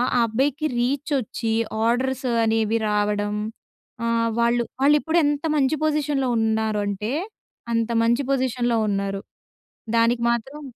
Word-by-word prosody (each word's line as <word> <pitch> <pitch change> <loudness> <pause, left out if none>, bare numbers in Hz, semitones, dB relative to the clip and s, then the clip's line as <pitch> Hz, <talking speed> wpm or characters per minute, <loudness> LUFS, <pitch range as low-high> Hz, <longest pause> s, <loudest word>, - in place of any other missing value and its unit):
ఆ - - +4
అబ్బాయికి 270 +7 0
రీచొచ్చి 255 -3 -1 0.3
ఆర్డర్స్ 255 +2 0 0.2
అనేవి 225 0 +1
రావడం. 205 0 0 0.7
ఆహ్, 230 0 +1
వాళ్ళు 235 +1 +2 0.2
వాళ్ళిప్పుడు 295 +4 +3
ఎంత 290 0 0
మంచి 280 0 +2
పొజిషన్‌లో 295 -3 +1
ఉన్నారు 220 -1 +1
అంటే, 205 +3 -3 0.6
అంత 230 0 0
మంచి 235 +4 +2
పొజిషన్‌లో 250 -3 +1
ఉన్నారు. 195 0 -2 0.7
దానికి 230 +1 +2
మాత్రం 265 +6 -4
235 Hz, 110 wpm, -23 LUFS, 220-275 Hz, 0.7 s, ఆ